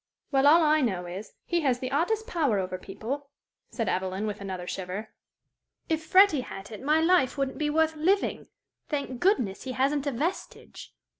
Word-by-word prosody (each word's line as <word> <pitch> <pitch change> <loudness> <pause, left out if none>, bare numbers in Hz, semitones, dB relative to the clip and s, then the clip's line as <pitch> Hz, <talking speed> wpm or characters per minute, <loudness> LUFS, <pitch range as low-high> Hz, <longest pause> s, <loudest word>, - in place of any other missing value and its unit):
"Well, 270 0 +4
all 325 +3 +7
I 310 0 +4
know 190 -8 -1
is, 185 +4 -7
he 345 -1 0
has 265 -5 +2
the 255 +1 -5
oddest 415 +10 0
power 315 - +1
over 185 -1 -3
people," 265 +10 -6 0.4
said 230 -4 -3
Evelyn, 190 +2 -1
with 210 -1 -4
another 185 -2 -5
shiver. 190 +4 -5 0.8
"If 320 0 0
Freddie 370 -4 +5
had 205 -3 -9
it, 215 - -8
my 300 +4 +3
life 325 -5 +3
wouldn't 275 +1 -2
be 300 -1 0
worth 320 +1 +2
living. 370 +6 0 0.4
Thank 280 -4 -3
goodness, 300 - +1
he 260 - -4
hasn't 275 +3 0
a - - +1
vestige!" 310 +10 -5
275 Hz, 175 wpm, -27 LUFS, 210-315 Hz, 0.8 s, all